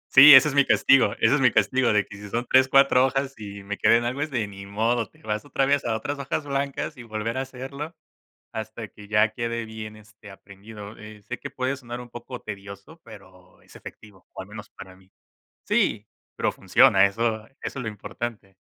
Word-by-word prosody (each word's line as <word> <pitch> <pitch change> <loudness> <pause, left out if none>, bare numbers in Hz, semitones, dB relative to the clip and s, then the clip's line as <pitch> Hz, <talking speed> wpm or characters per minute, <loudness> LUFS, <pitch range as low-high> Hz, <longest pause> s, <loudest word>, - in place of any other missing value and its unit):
Sí, 140 +2 +11
ese 135 - +8
es 140 - -5
mi 140 - +5
castigo, 125 -6 +4
ese - - +4
es 145 - +2
mi 125 - +6
castigo, 120 +4 +2
de 105 -2 +2
que 100 - -12
si 105 0 -10
son 120 +3 -2
3, 130 0 +5
4 135 -1 +5
hojas 135 +1 -2
y 100 -1 -9
me 100 +1 -6
quedé 115 - +5
en 120 - -2
algo, 130 +4 -3
es 155 - -2
de 120 -6 -2
ni 100 -1 -11
modo, 115 +1 0
te - - -25
vas 105 0 -3
otra 135 -1 0
vez 140 0 +1
a 115 -1 0
otras 145 +6 -4
hojas 140 +2 -3
blancas 140 +2 -3
y 120 - -9
volver 115 +1 -4
a 130 - -1
hacerlo 135 +5 -7 0.6
hasta 110 -1 -6
que 105 +2 -15
ya 105 +1 +3
quede 115 0 -3
bien, 110 -1 -8
este, 105 0 -16
aprendido. 100 +2 -12
Eh, 105 -1 -12
sé 125 -1 -7
que - - -7
puede 130 +1 -2
sonar 120 -2 -8
un 120 -1 -11
poco 120 +1 -8
tedioso, 100 +10 -10
pero 95 -4 -16
es - - -20
efectivo, 105 -3 -14
o, - - -7
al - - -16
menos 105 0 -10
para 95 -1 -13
mí 95 0 -24 0.6
sí, 105 0 +1 0.3
pero - - 0
funciona, 100 0 +5
eso 110 +1 -2
eso - - -34
es - - -6
lo 125 -4 -4
importante. 105 -1 -7
115 Hz, 220 wpm, -24 LUFS, 105-130 Hz, 0.6 s, Sí